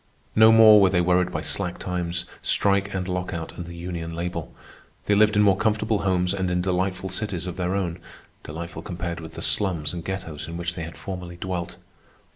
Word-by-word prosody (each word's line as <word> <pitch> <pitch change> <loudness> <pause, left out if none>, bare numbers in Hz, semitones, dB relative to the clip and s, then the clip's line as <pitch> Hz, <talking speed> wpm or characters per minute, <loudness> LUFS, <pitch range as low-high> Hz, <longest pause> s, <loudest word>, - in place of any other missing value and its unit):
No 110 +1 +8
more 110 -2 +8
were 95 - +6
they 90 -1 +2
worried 90 +1 +2
by - - -3
slack 90 0 -1
times, 90 -1 -3 0.2
strike 100 0 +2
and 95 -2 -3
lockout, 90 -3 -4
and 85 - -7
the 85 - -8
union 85 -1 -5
label. 90 +1 -4 0.5
They 105 - +2
lived 105 0 +4
in 105 - +5
more 100 -2 +5
comfortable 110 0 +1
homes 90 -1 +1
and 95 -2 -1
in 90 0 0
delightful 95 +1 -1
cities 95 -2 -3
of 90 - -5
their 90 +1 -1
own—delightful 85 -2 -6
compared 85 -1 -5
with 80 -1 -9
the - - -4
slums 85 -7 0
and 85 -2 -5
ghettos 80 -5 -5
in 85 +1 -6
which 85 0 -3
they 85 - -6
had 80 - -10
formerly 90 -2 -7
dwelt. 90 -1 -4
90 Hz, 195 wpm, -24 LUFS, 85-95 Hz, 0.5 s, No